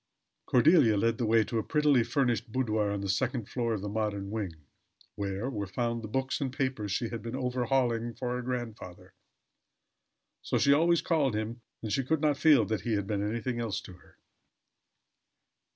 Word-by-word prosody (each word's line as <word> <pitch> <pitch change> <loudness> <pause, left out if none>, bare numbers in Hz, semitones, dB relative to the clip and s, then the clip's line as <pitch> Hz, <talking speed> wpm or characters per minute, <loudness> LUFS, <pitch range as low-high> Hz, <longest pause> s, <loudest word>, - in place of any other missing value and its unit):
Cordelia 125 - +5
led 115 +2 +1
the 120 - 0
way 115 0 +4
to 115 +1 -2
a - - -2
prettily 150 -5 +3
furnished 120 -2 0
boudoir 110 -4 0
on 100 -1 -2
the 100 - -3
second 115 +4 -1
floor 115 -3 -1
of 100 - -5
the 105 - -4
modern 100 -2 -2
wing, 100 -6 -3 0.6
where 100 +3 -3
were 105 -7 -3
found 115 +3 -2
the 110 - -6
books 130 +5 -2
and 135 -2 -1
papers 130 -6 -2
she 115 +4 -1
had 115 - -5
been 115 +2 -5
overhauling 125 -2 0
for 125 -1 -3
her 125 - -2
grandfather. 120 -7 -6 1.3
So - - -1
she 140 - +5
always 170 +3 +3
called 145 -9 +1
him, 110 +3 -4 0.2
and 110 -2 -2
she 135 - +1
could 155 +4 0
not 150 -2 +2
feel 145 -8 +5
that 110 +1 -2
he 120 - -2
had 100 -2 0
been 100 0 -2
anything 115 +3 -2
else 110 -5 -2
to 95 - -11
her. 90 - -20
115 Hz, 185 wpm, -29 LUFS, 105-130 Hz, 1.3 s, Cordelia